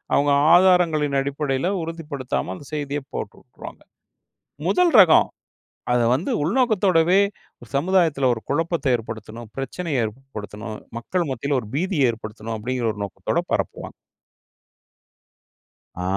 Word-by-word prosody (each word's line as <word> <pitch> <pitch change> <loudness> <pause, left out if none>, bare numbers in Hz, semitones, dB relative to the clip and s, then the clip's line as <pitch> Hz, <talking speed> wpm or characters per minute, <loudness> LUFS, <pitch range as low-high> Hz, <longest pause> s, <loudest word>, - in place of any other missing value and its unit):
அவுங்க 145 0 +3 0.2
ஆதாரங்களின் 170 -6 +4
அடிப்படையில 140 +2 -1
உறுதிப்படுத்தாம, 145 - -4
அந்த 140 - -12
செய்திய 145 -1 -2
போட்டு - - -5
வுட்ருவாங்க. - - -12 0.9
முதல் 360 -2 +3
ரகம். 175 -5 +6 0.6
அத 125 - +3 0.2
வந்து 180 - -2
உள்நோக்கத்தோடவே, 190 - +3 0.6
"சமுதாயத்துல 160 -4 +2
ஒரு 110 - -6
குழப்பத்த 160 -4 +1
ஏற்படுத்தணும், 115 0 -7
பிரச்சனைய 135 -1 -2
ஏற்படுத்தணும், 110 -2 -8 0.2
மக்கள் 175 +6 -2
மத்தியில 140 +3 -1
ஒரு 105 - -11
பீதிய 155 -6 +2
ஏற்படுத்தணும்" 110 0 -7
அப்டிங்கிற 120 +1 -2
ஒரு 105 - -8
நோக்கத்தோட 100 - -2
பரப்புவாங்க. - - -3 2.1
ஆ, - - -3
140 Hz, 110 wpm, -23 LUFS, 120-170 Hz, 2.1 s, ரகம்